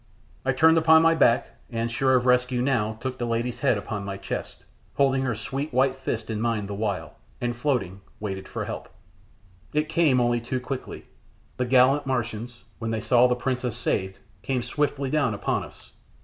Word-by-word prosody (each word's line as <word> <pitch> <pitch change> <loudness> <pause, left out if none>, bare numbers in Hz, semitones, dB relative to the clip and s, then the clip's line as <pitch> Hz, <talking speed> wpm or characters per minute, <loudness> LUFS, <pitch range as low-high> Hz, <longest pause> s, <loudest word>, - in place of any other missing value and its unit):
I 135 - +2
turned 160 +5 +5
upon 160 0 +6
my 165 0 +5
back, 130 -7 +3 0.2
and, 115 0 -2
sure 130 +2 +2
of 125 -1 +2
rescue 125 0 +3
now, 120 -4 +1
took 130 +1 -4
the 120 - -1
lady's 115 +1 -2
head 130 -6 +2
upon 100 0 -4
my 100 0 -5
chest, 95 - -6 0.3
holding 135 -1 +3
her 125 -3 -1
sweet, 135 +7 -4
white 130 +1 +2
fists 115 -4 -3
in 110 -1 -2
mine 115 -3 0
the 100 - -5
while, 100 -2 -3 0.2
and, 120 -1 -2
floating, 120 -8 -1 0.2
waited 95 -2 -5
for - - -4
help. - - -6 0.8
It 150 +1 0
came 160 -6 +3
only 120 -1 +2
too 125 +2 -2
quickly. 130 +1 -6 0.5
The 125 - 0
gallant 130 +3 +4
Martians, 120 -3 -3 0.2
when 115 -1 -3
they 110 0 -1
saw 125 +3 +4
the 125 - +1
princess 125 -1 -2
saved, 95 -5 -1 0.2
came 130 -2 -1
swiftly 140 +1 -1
down 140 -8 +1
upon - - -1
us. - - -14
125 Hz, 185 wpm, -25 LUFS, 115-135 Hz, 0.8 s, upon